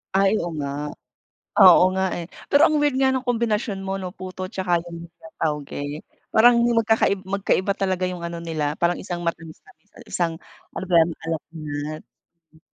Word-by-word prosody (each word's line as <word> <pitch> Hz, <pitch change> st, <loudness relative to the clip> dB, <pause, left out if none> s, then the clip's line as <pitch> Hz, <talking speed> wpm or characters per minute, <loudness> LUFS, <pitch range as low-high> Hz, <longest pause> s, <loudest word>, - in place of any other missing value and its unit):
Ay, 195 Hz, 0 st, +4 dB
oo 175 Hz, -, -3 dB
nga, 140 Hz, -1 st, -3 dB, 0.9 s
oo 180 Hz, -1 st, +9 dB
nga 190 Hz, 0 st, +1 dB
eh. 170 Hz, -, -5 dB, 0.2 s
Pero 285 Hz, -, +5 dB
ang 310 Hz, -, +1 dB
weird 285 Hz, -3 st, +2 dB
nga 265 Hz, 0 st, +3 dB
ng 260 Hz, -, -1 dB
kombinasyon 225 Hz, -3 st, 0 dB
mo 195 Hz, -, -2 dB
'no, 185 Hz, -2 st, -4 dB
puto 185 Hz, 0 st, -7 dB
tsaka 175 Hz, -3 st, 0 dB
lumpiang 170 Hz, -1 st, -12 dB
toge, 150 Hz, 0 st, -3 dB, 0.3 s
parang 235 Hz, +2 st, +6 dB
hindi 235 Hz, 0 st, +2 dB
magkakai 225 Hz, -3 st, +2 dB
magkaiba 195 Hz, 0 st, 0 dB
talaga 190 Hz, -2 st, -1 dB
yung 175 Hz, -1 st, -5 dB
ano 170 Hz, 0 st, -6 dB
nila, 155 Hz, -3 st, -2 dB
parang 170 Hz, +2 st, 0 dB
isang 175 Hz, -2 st, -5 dB
matamis-tamis 170 Hz, +4 st, -7 dB
at -, -, -13 dB
isang 170 Hz, -2 st, 0 dB, 0.4 s
ano -, -, -4 dB
ba -, -, +2 dB
'yan, 165 Hz, 0 st, +5 dB
maalat-alat. 155 Hz, -2 st, -5 dB, 0.4 s
Mm. 160 Hz, -1 st, -26 dB
180 Hz, 170 wpm, -23 LUFS, 165-200 Hz, 0.9 s, oo